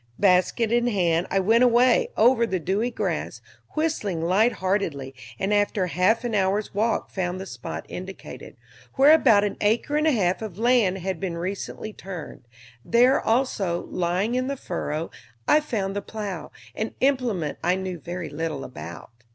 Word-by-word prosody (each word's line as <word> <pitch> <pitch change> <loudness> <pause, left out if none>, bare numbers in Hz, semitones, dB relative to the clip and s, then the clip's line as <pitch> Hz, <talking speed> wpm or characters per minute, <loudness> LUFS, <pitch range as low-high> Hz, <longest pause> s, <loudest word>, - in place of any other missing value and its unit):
Basket 200 +4 +3
in 240 0 +2
hand 175 -6 +1
I 195 - +1
went 225 +6 +4
away, 245 0 +4
over 235 +1 +4
the 190 -4 -1
dewy 195 +8 0
grass, 240 - -3 0.4
whistling 305 - -1
light 190 +8 +3
heartedly, 170 -9 -2 0.2
and 195 +2 0
after 205 -2 +1
half 185 +7 +2
an 240 -2 -2
hour's 200 +1 0
walk 220 +3 0
found 185 -1 -2
the 190 - -6
spot 125 -9 -7
indicated, 185 +1 -9 0.4
where 275 +3 +7
about 230 -10 +5
an 205 - -2
acre 235 +8 +1
and 305 +1 +2
a - - +5
half 190 -7 +1
of 210 -5 -6
land 230 -5 +3
had 190 -2 -3
been 180 -3 -3
recently 195 +4 -5
turned; 170 -11 -9 0.4
there 245 +3 +4
also, 220 -8 0
lying 180 +6 0
in 255 +1 0
the 275 0 -3
furrow, 165 -5 -4 0.4
I 300 - +6
found 205 -10 -3
the 205 - -1
plow, 200 -8 -6 0.2
an 220 - -4
implement 245 - 0
I 175 +2 +3
knew 185 -2 -4
very 175 +1 -6
little 155 -2 -3
about. 85 -4 -9
195 Hz, 165 wpm, -24 LUFS, 180-235 Hz, 0.4 s, where